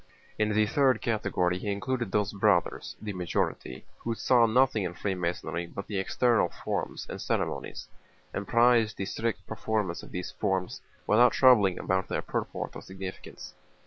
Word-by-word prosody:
In 110 0 +2
the 105 0 +3
third 130 +1 +3
category 95 -5 0
he 100 - -2
included 120 +1 -2
those 105 0 0
Brothers 100 -4 +1
(the 105 -2 -5
majority) 85 -7 -2
who 115 -1 -3
saw 120 0 +4
nothing 115 -2 +3
in 90 -1 -4
Freemasonry 85 -2 -2
but 100 +3 -7
the 100 -3 -3
external 115 -1 +2
forms - - -4
and - - -6
ceremonies, - - -2 0.5
and 100 0 -4
prized 115 -2 +4
the 95 - -2
strict 115 +3 -3
performance 110 -5 -2
of - - -12
these 90 -1 -4
forms 95 -2 -2 0.2
without 120 +4 +5
troubling 110 -8 +5
about 95 0 0
their - - -2
purport - - -4
or - - -7
significance. 95 0 -8
105 Hz, 155 wpm, -28 LUFS, 95-115 Hz, 0.5 s, without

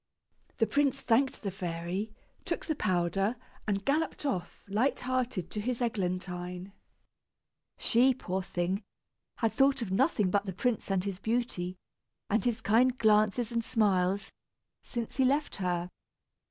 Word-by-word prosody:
The 225 - +4
prince 275 +1 +2
thanked 260 +1 +2
the 200 - -1
fairy, 180 +3 -3 0.3
took - - -3
the 315 - 0
powder, 195 +1 +1 0.3
and 200 -1 0
galloped 305 +1 0
off, 185 -11 -3
light 220 +8 +1
hearted, 250 -8 -1
to 210 - -2
his 245 +2 -1
Eglantine. 180 -4 -2 1.0
She, 250 +2 +4
poor 190 -6 -2
thing, 180 +2 -1 0.5
had 225 -2 0
thought 270 -2 +3
of 195 - -5
nothing 210 - +2
but 205 +1 +1
the 190 - -2
prince 235 +4 -1
and 190 -2 +1
his 195 -2 -4
beauty, 205 -5 -1 0.5
and 220 - +3
his 240 -3 0
kind 245 +5 +4
glances 215 +1 +3
and 230 -1 0
smiles, 195 -4 +1 0.5
since 235 -1 -5
he 265 - +4
left 285 +3 +1
her. 180 -2 -1
210 Hz, 140 wpm, -30 LUFS, 185-245 Hz, 1.0 s, The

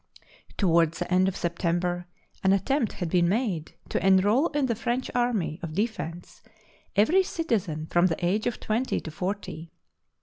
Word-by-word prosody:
Toward 170 -4 +3
the 175 +1 -3
end 185 +1 +4
of 190 - -1
September 175 0 -1 0.4
an 190 0 +5
at 195 -1 +1
tempt 270 -5 +1
had 175 - -3
been 170 +1 +2
made 195 -7 -1
to - - -1
enrol 205 - +4
in 290 -2 0
the 240 - +1
French 240 +3 -2
army 230 -10 0
of 160 -3 -6
defence 175 -5 -4 0.5
every 265 - +5
citizen 215 - -2
from 175 +3 +3
the 175 0 -2
age 205 +5 +1
of 240 - -2
twenty 230 +4 -1
to 160 - -8
forty. 180 -2 -4
190 Hz, 165 wpm, -27 LUFS, 175-230 Hz, 0.5 s, an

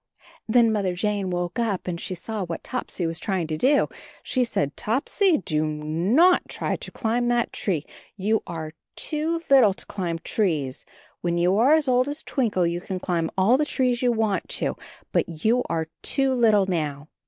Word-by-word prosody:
Then 230 0 +5
Mother 195 -4 0
Jane 200 0 -1
woke 175 +4 -2
up 215 -6 -1
and 170 -1 -3
she 185 - -4
saw 210 +3 -4
what 170 -2 -5
Topsy 250 -8 -3
was 165 +1 -2
trying 185 -1 -1
to 155 0 -3
do. 270 - +3 0.4
She 255 - +1
said, 145 - -1
"Topsy, 310 - +1
do 155 -4 -1
not 165 - +2
try - - -2
to - - -8
climb 240 +1 0
that 240 -1 +1
tree; 165 -7 -1 0.3
you 210 +3 +1
are 160 -2 -5 0.2
too 320 +2 -1
little 245 -8 +6
to - - -10
climb 175 -5 -3
trees; 160 - -1 0.4
when 170 -1 0
you 175 +2 +3
are 265 +6 +5
as 310 -3 +1
old 255 +1 +3
as 295 +2 -5
Twinkle 215 -9 0
you 170 +1 -1
can 190 0 -4
climb 170 -3 -1
all 220 +8 +4
the - - +3
trees 255 -5 0
you 250 -1 +3
want 220 -5 0
to, - - -1 0.4
but 165 +1 -2
you 240 +3 +4
are 160 -1 -1
too 270 -1 +1
little 220 -5 +4
now. 150 -5 -2
200 Hz, 185 wpm, -24 LUFS, 170-245 Hz, 0.4 s, little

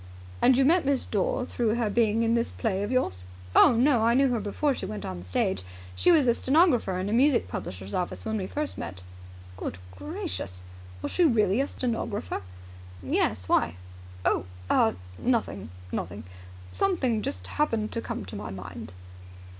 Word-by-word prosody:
And 255 0 +6
you 270 - +4
met 335 +4 +4
Miss 275 -2 +1
Dore 220 +5 0
through 235 -3 0
her 235 -2 0
being 225 +1 +2
in 230 0 +2
this 235 0 +1
play 200 -4 -1
of 205 - -2
yours?" 245 - 0 0.3
"Oh, - - +8
no. 245 +1 +4
I 230 +1 +4
knew 270 +1 +4
her 240 -2 0
before 215 +8 0
she - - -5
went 105 -2 -5
on 90 -1 -5
the - - -9
stage. 95 +1 0 0.3
She 355 - +4
was 315 -5 +5
a 240 - +5
stenographer 260 - +3
in 185 +1 -2
a 205 - -1
music 255 - +4
publisher's 95 +1 -6
office 180 -1 -3
when 220 0 -1
we 190 -3 -2
first 300 +6 -3
met." 90 0 -6 0.5
"Good 90 - -4 0.2
gracious! 90 -1 -5 0.4
Was - - -2
she 360 - +2
really 225 - +3
a 280 - 0
stenographer?" 225 - -3 0.6
"Yes. 90 +1 0
Why?" 85 - +2 0.5
"Oh - - +2 0.3
ah 110 - +4 0.3
nothing, 220 - -1 0.2
nothing. 100 +5 -4 0.5
Something 265 - +1
just 90 - -4
happened 225 - 0
to 230 - -3
come 105 - -5
to 95 - -9
my 105 +1 -5
mind." 95 -2 -8
220 Hz, 180 wpm, -27 LUFS, -, 0.6 s, Oh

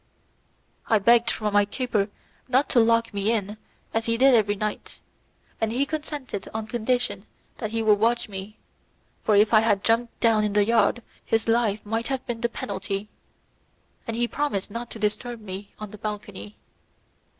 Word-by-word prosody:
I 220 - +4
begged 235 +3 +4
from 210 -1 -1
my 205 0 +5
keeper 210 -1 -1 0.4
not 260 +3 +2
to 250 - +4
lock 230 0 +3
me 200 +2 +1
in 210 -2 -2 0.4
as 225 0 0
he 230 0 +1
did 265 +2 +6
every 210 -3 +3
night, 210 +1 -4 0.6
and 220 -1 +1
he 260 +4 +1
consented 295 -8 -5
on 220 -1 -2
condition 220 -2 -1 0.3
that 215 - -3
he 225 +1 -1
would 210 -2 +4
watch 235 +3 +2
me, 200 +1 -8 0.7
for 215 - +3
if 210 +2 +4
I 215 - +8
had 210 -3 +2
jumped 230 +1 +1
down 225 -2 +3
in 210 -1 0
the 205 0 +4
yard 230 +1 +2 0.2
his 225 0 0
life 225 -3 +1
might 225 +2 -2
have 265 -1 -3
been 230 -1 -4
the 235 - +1
penalty, 200 -1 -4 1.0
and 230 0 -3
he 240 0 +1
promised 225 -9 -2
not 235 +2 -5
to - - -7
disturb 220 +3 -2
me 200 -1 -8
on 215 -2 -8
the 215 - -11
balcony. 200 - -6
220 Hz, 175 wpm, -25 LUFS, 205-235 Hz, 1.0 s, I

